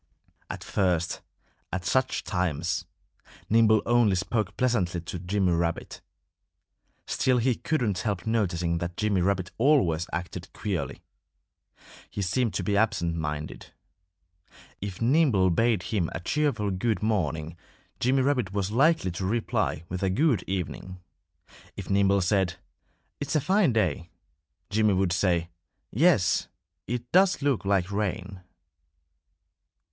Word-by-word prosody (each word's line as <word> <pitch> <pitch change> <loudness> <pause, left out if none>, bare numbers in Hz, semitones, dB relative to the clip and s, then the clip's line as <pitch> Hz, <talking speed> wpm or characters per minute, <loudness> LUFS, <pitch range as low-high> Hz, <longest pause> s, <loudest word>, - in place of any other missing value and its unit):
At - - -6
first, 90 -4 0 0.5
at 95 0 -3
such 130 +4 +1
times, 90 -3 -1 0.7
Nimble 110 -1 +5
only 120 -4 +3
spoke 105 +4 -2
pleasantly 105 -9 +1
to 85 +1 -6
Jimmy 95 +1 0
Rabbit. 85 0 -2 1.0
Still 130 -1 +1
he 125 +2 +2
couldn't 115 - -1
help 100 -4 -2
noticing 90 -7 0
that 85 0 -5
Jimmy 105 -4 +1
Rabbit 90 -1 0
always 110 - +3
acted 85 +1 -5
queerly. 90 -9 -4 1.1
He 100 - -3
seemed 115 +5 0
to 95 - -1
be 100 +3 0
absent 100 -6 +1
minded. 75 -5 -5 1.1
If 100 +1 -5
Nimble 120 - +3
bade 110 +1 +2
him 95 -6 -1
a - - -3
cheerful 110 - 0
good 105 +4 -1
morning 80 -7 -1 0.4
Jimmy 130 +2 +2
Rabbit 125 -8 0
was 100 -1 -1
likely 135 - +3
to 90 +2 -4
reply 110 -7 -1
with 90 +1 -5
a 95 - +1
good 135 +4 +2
evening. 95 0 -4 0.8
If 100 -1 -6
Nimble 100 0 +3
said, 90 -1 +1 0.6
"It's 145 +3 -3
a - - +5
fine 185 +2 +3
day," 90 -7 0 0.6
Jimmy 105 -1 +3
would 95 -2 +1
say, 85 -2 +1 0.4
"Yes! 140 - +3 0.4
It 120 0 -4
does 185 -4 +4
look 135 -8 +1
like 100 -1 +1
rain." 100 -2 -3
100 Hz, 125 wpm, -27 LUFS, 90-115 Hz, 1.1 s, Nimble